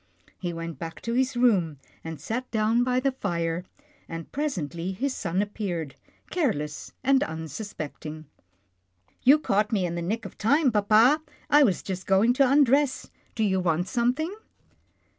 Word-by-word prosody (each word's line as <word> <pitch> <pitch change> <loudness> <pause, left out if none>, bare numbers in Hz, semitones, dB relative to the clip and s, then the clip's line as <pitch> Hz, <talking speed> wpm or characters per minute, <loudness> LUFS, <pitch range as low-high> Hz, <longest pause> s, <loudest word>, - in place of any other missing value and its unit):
He 175 -2 -3
went 165 -3 -6
back 165 -1 -6
to 230 - -2
his 255 0 +1
room, 190 - +3 0.3
and 160 -1 -6
sat 250 +3 -4
down 225 +2 +2
by 250 0 +1
the 270 +1 +1
fire, 170 -7 -2 0.4
and 165 0 -7
presently 180 - -3
his 265 +8 -2
son 185 -1 -1
appeared, 180 -8 -4 0.4
careless 175 - -2
and 270 +1 +4
unsuspecting. 160 -1 -6 0.5
" 90 +1 -42
You 275 +4 +7
caught 210 -7 0
me 200 -5 +1
in 170 - -3
the 170 - -3
nick 215 +7 -2
of - - -10
time, 275 +5 +3
papa, 220 +8 +4 0.3
I 295 - +7
was 205 - +3
just 190 -1 -5
going 195 +5 +4
to 265 0 +3
undress. 280 -1 +3 0.2
Do 220 - 0
you 190 -2 +2
want 175 0 0
some 245 0 +1
thing?" 315 +6 -3
205 Hz, 160 wpm, -26 LUFS, 170-255 Hz, 0.5 s, You